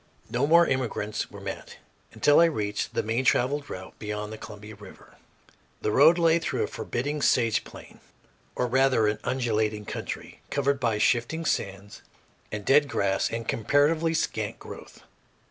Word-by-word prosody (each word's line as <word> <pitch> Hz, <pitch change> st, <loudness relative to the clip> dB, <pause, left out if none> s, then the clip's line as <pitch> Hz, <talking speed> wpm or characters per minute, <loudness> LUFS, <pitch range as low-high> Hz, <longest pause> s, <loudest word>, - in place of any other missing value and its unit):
No 125 Hz, +4 st, +1 dB
more 170 Hz, +2 st, +6 dB
immigrants 120 Hz, -6 st, -2 dB
were 100 Hz, -, -11 dB
met 95 Hz, -1 st, -7 dB, 0.3 s
until 145 Hz, -, +4 dB
I 170 Hz, -, +7 dB
reached 105 Hz, -10 st, -2 dB
the -, -, +1 dB
main 115 Hz, +4 st, -1 dB
traveled 140 Hz, +3 st, +1 dB
route 95 Hz, 0 st, -8 dB
beyond 105 Hz, 0 st, -5 dB
the -, -, -7 dB
Columbia 105 Hz, +1 st, -10 dB
River. 105 Hz, -2 st, -15 dB, 0.7 s
The -, -, +1 dB
road 155 Hz, +9 st, +6 dB
lay 165 Hz, -1 st, +4 dB
through 165 Hz, -, -2 dB
a -, -, -1 dB
forbidding 145 Hz, +5 st, -3 dB
sage 115 Hz, -5 st, +2 dB
plain, -, -, -13 dB, 0.6 s
or 125 Hz, -, 0 dB
rather 130 Hz, -2 st, +3 dB
an 105 Hz, 0 st, -1 dB
undulating 110 Hz, -4 st, -1 dB
country, -, -, -7 dB
covered 140 Hz, -1 st, 0 dB
by 115 Hz, -5 st, 0 dB
shifting 120 Hz, +9 st, +1 dB
sands 100 Hz, -6 st, -3 dB, 0.5 s
and 105 Hz, -1 st, -5 dB
dead 145 Hz, +1 st, +5 dB
grass 95 Hz, -1 st, 0 dB
of 115 Hz, 0 st, -4 dB
comparatively 150 Hz, +9 st, +2 dB
scant 110 Hz, -9 st, -2 dB
growth. -, -, -12 dB
120 Hz, 155 wpm, -26 LUFS, 105-145 Hz, 0.7 s, I